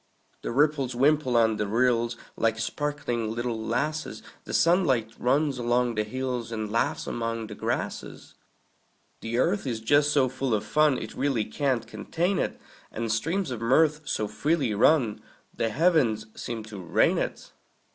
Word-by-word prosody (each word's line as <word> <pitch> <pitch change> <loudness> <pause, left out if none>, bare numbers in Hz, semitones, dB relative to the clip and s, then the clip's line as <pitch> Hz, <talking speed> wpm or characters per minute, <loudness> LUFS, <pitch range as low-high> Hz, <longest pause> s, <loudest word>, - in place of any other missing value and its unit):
The - - -4
ripples 140 -1 +1
wimple 135 -1 +3
on 110 -2 +3
the 105 - -1
rills, 120 +1 +1 0.2
Like 115 0 +1
sparkling 120 -2 -2
little 115 -1 -3
lasses; 150 +7 -2 0.2
The - - -7
sunlight 140 - +3
runs 135 +1 +1
along 120 0 +1
the 110 -1 0
hills, 125 0 -4
And 110 -2 -3
laughs 115 - 0
among 115 -1 -3
the 105 - -8
grasses. - - -4 0.9
The 115 +1 -3
earth 175 +5 +1
is 115 -3 -2
just 145 +6 +3
so 140 -3 +3
full 130 -2 -1
of 105 - -3
fun 150 -3 +3
It 110 - -6
really 130 -5 0
can't 130 +2 -1
contain 170 - -2
it; - - -2 0.3
And 115 0 -3
streams 160 - -1
of 120 -2 -5
mirth 150 +6 +3
so 110 -6 -1
freely 145 -3 0
run 115 0 +3 0.3
The 115 - -1
heavens 135 -7 +2
seem 115 -2 -5
to 105 -2 -9
rain 90 - +2
it. - - -4
125 Hz, 155 wpm, -27 LUFS, 115-145 Hz, 0.9 s, wimple